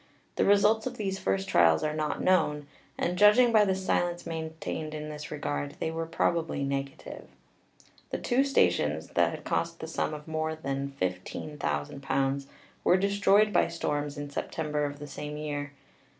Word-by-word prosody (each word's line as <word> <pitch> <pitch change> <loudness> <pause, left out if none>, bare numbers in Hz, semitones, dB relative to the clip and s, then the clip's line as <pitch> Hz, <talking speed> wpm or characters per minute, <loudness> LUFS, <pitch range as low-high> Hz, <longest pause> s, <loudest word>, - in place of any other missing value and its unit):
The - - +2
results 210 +3 +4
of 250 -1 -6
these 195 -2 -2
first 95 0 0
trials 85 -2 +4
are 155 0 0
not 155 -1 -2
known, 150 -6 +2 0.3
and 180 +1 -1
judging 210 +4 +7
by 215 -2 +6
the 190 -1 +1
silence 175 -2 -1
maintained 160 -1 -4
in 150 0 -5
this 150 0 -7
regard 145 -1 -3
they 160 - -1
were 165 0 -3
probably 165 -3 0
negative. 140 0 -4 0.8
The - - -2
two 255 +2 +2
stations, 275 0 +2
that - - +3
had - - -7
cost 170 0 -1
the - - -5
sum 160 -1 -2
of 150 +1 -10
more 160 0 -2
than 140 -2 -4
£15,000, 135 - -2 0.4
were 180 - +5
destroyed 200 +2 +3
by - - +4
storms 150 -3 -2
in 145 0 -6
September 150 0 -2
of 145 0 -4
the 145 - -8
same 150 +1 -6
year. 145 -1 -4
155 Hz, 165 wpm, -29 LUFS, 145-180 Hz, 0.8 s, judging